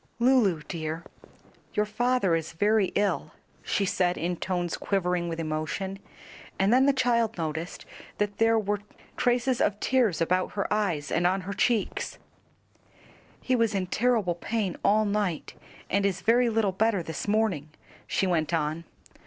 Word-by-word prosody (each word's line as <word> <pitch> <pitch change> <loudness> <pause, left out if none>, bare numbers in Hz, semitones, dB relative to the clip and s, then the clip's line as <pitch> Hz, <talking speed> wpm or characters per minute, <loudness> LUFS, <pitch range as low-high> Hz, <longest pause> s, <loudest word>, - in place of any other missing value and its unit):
"Lulu, 235 - +3
dear, 160 0 -4 0.7
your 210 - +2
father 230 -3 +1
is 165 -1 -1
very 205 +3 +3
ill," 205 0 0 0.3
she 200 - 0
said 180 -1 +1
in 175 +2 -1
tones 175 -1 -2
quivering 180 -3 -1
with 165 0 -4
emotion, 165 +5 -3 0.6
and 195 +4 +3
then 260 +2 +5
the - - +6
child 235 -5 +1
noticed 160 +1 -4 0.3
that 205 -1 -2
there 225 0 +4
were 205 -1 0 0.4
traces 245 0 +1
of 205 - +1
tears 240 -9 +2
about 180 +2 +1
her 200 - -1
eyes 175 -9 -1
and 175 +2 +2
on 190 +2 +1
her 195 +2 -5
cheeks, 220 +1 0 1.2
"He 255 - +1
was 230 -3 +1
in 190 -1 0
terrible 215 -2 +1
pain 195 +2 -2
all 215 +1 +4
night, 205 -5 -1 0.3
and 200 +2 +1
is 190 -1 0
very 235 +5 +4
little 220 -3 +1
better 200 -1 +1
this 160 +3 -5
morning," 205 -8 +1 0.4
she - - +1
went 170 -2 +1
on. 160 +1 -2
195 Hz, 155 wpm, -27 LUFS, 175-220 Hz, 1.2 s, the